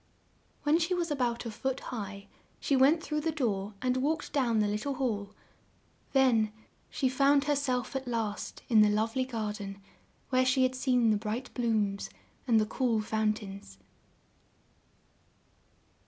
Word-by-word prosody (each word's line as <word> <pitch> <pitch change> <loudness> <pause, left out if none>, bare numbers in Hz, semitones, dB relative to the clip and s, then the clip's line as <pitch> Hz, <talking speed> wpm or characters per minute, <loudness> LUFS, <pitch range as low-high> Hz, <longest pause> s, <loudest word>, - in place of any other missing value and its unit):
When 300 +3 +3
she 350 +2 +1
was 340 -3 -1
a - - +1
bout 240 -3 -1
a 230 - -4
foot 265 +5 -2
high, 200 -3 -6 0.3
she 280 - +1
went 285 +6 +4
through 300 -1 -2
the 325 +1 0
door 210 -8 -2
and 255 0 +1
walked 295 +5 -1
down 245 -6 +2
the 210 -1 +3
lit 210 +1 -1
tle 280 +2 -2
hall; 210 -6 -2 0.8
then 245 -6 +3 0.4
she 265 - 0
found 275 +2 +3
herself, 275 -4 -1
at 265 -1 -3
last, 225 -3 -3
in 220 -3 +6
the 210 - +6
love 220 +2 0
ly 260 0 +1
garden, 210 -5 -4 0.5
where 255 0 +4
she 260 +1 +3
had 255 0 +2
seen 255 -3 +2
the 210 - +3
bright 225 +4 -4
blooms 215 -5 0 0.4
and 230 -3 +5
the 215 - +2
cool 230 0 0
foun 215 0 0
tains. 195 - -10
245 Hz, 160 wpm, -30 LUFS, 215-270 Hz, 0.8 s, in